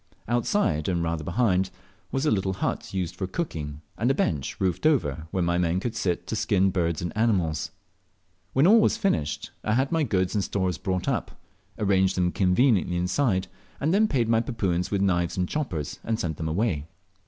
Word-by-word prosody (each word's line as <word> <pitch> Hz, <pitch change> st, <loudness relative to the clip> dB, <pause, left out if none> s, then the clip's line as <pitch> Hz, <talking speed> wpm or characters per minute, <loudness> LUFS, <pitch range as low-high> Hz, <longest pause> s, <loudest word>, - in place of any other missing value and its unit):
Outside, 120 Hz, -, +1 dB
and 85 Hz, -2 st, 0 dB
rather 80 Hz, -2 st, -2 dB
behind, 95 Hz, -, +1 dB, 0.4 s
was 135 Hz, +2 st, 0 dB
a 150 Hz, -, +3 dB
little 95 Hz, -2 st, +1 dB
hut, 95 Hz, -, -3 dB
used 90 Hz, -2 st, -3 dB
for 95 Hz, 0 st, -3 dB
cooking, 75 Hz, -, -4 dB, 0.2 s
and 120 Hz, +4 st, +2 dB
a 135 Hz, -, +3 dB
bench, 75 Hz, -, -1 dB
roofed 95 Hz, -, +1 dB
over, 120 Hz, -, +1 dB
where 90 Hz, +1 st, -1 dB
my 85 Hz, +1 st, +1 dB
men 85 Hz, +1 st, +1 dB
could 115 Hz, +3 st, -3 dB
sit 90 Hz, -5 st, -1 dB
to 105 Hz, -, -3 dB
skin 95 Hz, -3 st, +2 dB
birds 85 Hz, -3 st, -1 dB
and 85 Hz, -, -4 dB
animals. 95 Hz, -9 st, +1 dB, 0.8 s
When 135 Hz, +4 st, +4 dB
all 220 Hz, +5 st, +7 dB
was -, -, +2 dB
finished, 80 Hz, -, -1 dB
I 110 Hz, -, +1 dB
had 135 Hz, +2 st, +1 dB
my 165 Hz, -1 st, +2 dB
goods 95 Hz, -9 st, +1 dB
and 105 Hz, -3 st, +1 dB
stores 95 Hz, -3 st, -1 dB
brought 95 Hz, -2 st, -2 dB
up, -, -, -2 dB, 0.4 s
arranged 95 Hz, -2 st, +2 dB
them 90 Hz, -1 st, +2 dB
conveniently 95 Hz, -1 st, +2 dB
inside, 95 Hz, +1 st, +1 dB, 0.3 s
and 155 Hz, +5 st, +1 dB
then 215 Hz, +2 st, +4 dB
paid 125 Hz, -, +1 dB
my 115 Hz, 0 st, +3 dB
Papuans 95 Hz, -8 st, -1 dB
with 100 Hz, -1 st, 0 dB
knives 85 Hz, -3 st, +1 dB
and 90 Hz, -1 st, +1 dB
choppers, 95 Hz, -, -3 dB
and 110 Hz, -1 st, -1 dB
sent 80 Hz, -3 st, -2 dB
them 80 Hz, -1 st, -3 dB
away. 80 Hz, -4 st, 0 dB
95 Hz, 190 wpm, -26 LUFS, 85-115 Hz, 0.8 s, all